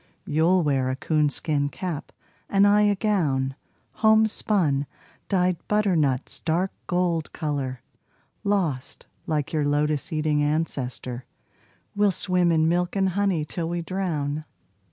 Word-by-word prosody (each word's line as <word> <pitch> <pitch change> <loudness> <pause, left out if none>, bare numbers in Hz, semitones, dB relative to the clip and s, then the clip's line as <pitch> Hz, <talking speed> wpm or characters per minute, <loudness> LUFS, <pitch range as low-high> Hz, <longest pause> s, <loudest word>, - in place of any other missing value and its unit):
You'll 165 +4 +3
wear 135 -3 +1
a 130 - -1
coonskin 150 0 0
cap, 165 -1 -5 0.4
and 195 0 +4
I 205 +1 +5
a 205 -1 +3
gown 155 - 0 0.4
Homespun, 210 -9 +3 0.4
dyed 180 -2 +2
butternut's 165 -11 +1
dark 175 +4 0 0.2
gold 175 -3 0
color. 140 -6 -3 0.6
Lost, 175 -11 -1 0.2
like 150 -2 -1
your 155 -2 +1
lotus 145 0 0
eating 155 -1 +1
ancestor, 130 -5 -2 0.7
We'll 205 0 +4
swim 180 -2 +2
in 160 -1 +3
milk 175 +2 0
and 190 -1 +2
honey 185 -4 0
till 165 +1 -3
we 170 0 -2
drown. 155 -5 -2
160 Hz, 120 wpm, -25 LUFS, 145-185 Hz, 0.7 s, I